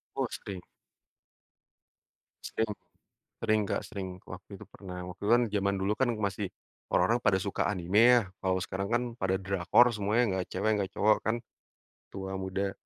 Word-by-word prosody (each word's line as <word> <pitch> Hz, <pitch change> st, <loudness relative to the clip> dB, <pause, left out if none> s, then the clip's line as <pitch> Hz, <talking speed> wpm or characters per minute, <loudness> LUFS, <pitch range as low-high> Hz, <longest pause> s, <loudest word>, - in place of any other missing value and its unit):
Oh, -, -, 0 dB
sering. 95 Hz, -3 st, -7 dB, 1.8 s
Sering. 110 Hz, -1 st, -1 dB, 0.7 s
Sering, 110 Hz, -1 st, +2 dB
Kak, -, -, 0 dB
sering. 100 Hz, -4 st, -5 dB, 0.2 s
Waktu 95 Hz, 0 st, -10 dB
itu -, -, -10 dB
pernah, 90 Hz, -2 st, -9 dB
waktu 90 Hz, +1 st, -10 dB
itu 105 Hz, -, 0 dB
kan 120 Hz, -, +3 dB
zaman 100 Hz, -1 st, 0 dB
dulu 95 Hz, +2 st, +1 dB
kan 130 Hz, +1 st, +1 dB
masih 100 Hz, -2 st, -2 dB, 0.4 s
orang-orang 120 Hz, +1 st, +3 dB
pada 100 Hz, -3 st, +4 dB
suka 100 Hz, +1 st, -1 dB
anime 95 Hz, +2 st, +2 dB, 0.2 s
ya, -, -, -1 dB, 0.2 s
kalau 95 Hz, -1 st, +1 dB
sekarang 95 Hz, +1 st, -3 dB
kan 120 Hz, +1 st, +2 dB, 0.2 s
pada 95 Hz, 0 st, +1 dB
drakor 95 Hz, +5 st, +4 dB
semuanya, 105 Hz, +3 st, +2 dB, 0.2 s
nggak 90 Hz, -, -2 dB
cewek, 105 Hz, +4 st, +1 dB
nggak 95 Hz, -1 st, -2 dB
cowok 105 Hz, +1 st, +4 dB
kan, 110 Hz, -, +1 dB, 0.8 s
tua, 95 Hz, 0 st, -4 dB
muda. 95 Hz, +1 st, -2 dB
100 Hz, 160 wpm, -30 LUFS, 95-110 Hz, 1.8 s, pada